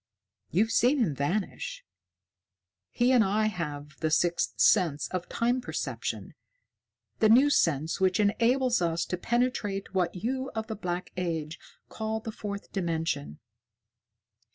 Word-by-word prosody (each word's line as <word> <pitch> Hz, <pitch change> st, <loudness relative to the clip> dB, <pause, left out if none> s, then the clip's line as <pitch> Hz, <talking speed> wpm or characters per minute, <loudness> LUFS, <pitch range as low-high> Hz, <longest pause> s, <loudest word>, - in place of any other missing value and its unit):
You've 215 Hz, +6 st, +2 dB
seen 255 Hz, +6 st, +4 dB
him 215 Hz, -, +1 dB
vanish. 175 Hz, +9 st, -3 dB, 1.0 s
He 245 Hz, +1 st, +2 dB
and 250 Hz, -3 st, +6 dB
I 210 Hz, +2 st, +1 dB
have 150 Hz, -7 st, -4 dB
the 160 Hz, -, 0 dB
sixth 170 Hz, +2 st, +1 dB
sense 150 Hz, -5 st, +4 dB
of 180 Hz, -1 st, -4 dB
Time 240 Hz, +2 st, 0 dB
Perception 245 Hz, -, -4 dB, 0.9 s
the 220 Hz, -, +5 dB
new 265 Hz, +6 st, +6 dB
sense 160 Hz, -, +1 dB
which 185 Hz, 0 st, +2 dB
enables 240 Hz, +3 st, +2 dB
us 170 Hz, 0 st, 0 dB
to -, -, -2 dB
penetrate 210 Hz, -3 st, -1 dB
what 185 Hz, -2 st, 0 dB
you 260 Hz, +8 st, -2 dB
of 220 Hz, 0 st, -2 dB
the 220 Hz, -, -5 dB
Black 180 Hz, -3 st, -4 dB
Age 165 Hz, -3 st, -3 dB, 0.3 s
call 220 Hz, 0 st, -3 dB
the 220 Hz, 0 st, -6 dB
Fourth 200 Hz, -1 st, -6 dB
Dimension. 165 Hz, -, -2 dB
195 Hz, 130 wpm, -28 LUFS, 170-230 Hz, 1.0 s, and